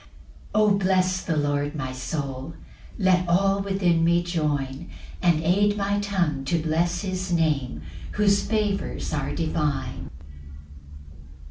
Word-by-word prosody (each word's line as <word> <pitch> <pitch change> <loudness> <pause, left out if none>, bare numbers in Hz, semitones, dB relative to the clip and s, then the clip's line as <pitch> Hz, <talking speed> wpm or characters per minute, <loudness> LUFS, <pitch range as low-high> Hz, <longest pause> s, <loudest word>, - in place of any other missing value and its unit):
1 215 - +4
O 210 - +4
Bless 185 -1 +2
the 160 -3 -2
Lord, 145 0 0
my 130 -3 -3
soul; 135 +2 -4 0.4
Let 185 -3 +2
all 195 +3 +3
within 190 -4 +1
me 170 +1 +3
join, 150 -3 -2 0.3
And 170 -3 +3
aid 205 +5 +3
my 200 0 0
tongue 175 -9 -1
to 170 +5 +1
bless 165 +2 0
his 185 -1 -3
Name, 145 - 0 0.3
Whose 200 -1 +3
favours 210 -5 -1
are 150 -2 -2
divine. 155 -3 -2
170 Hz, 125 wpm, -25 LUFS, 150-195 Hz, 0.4 s, 1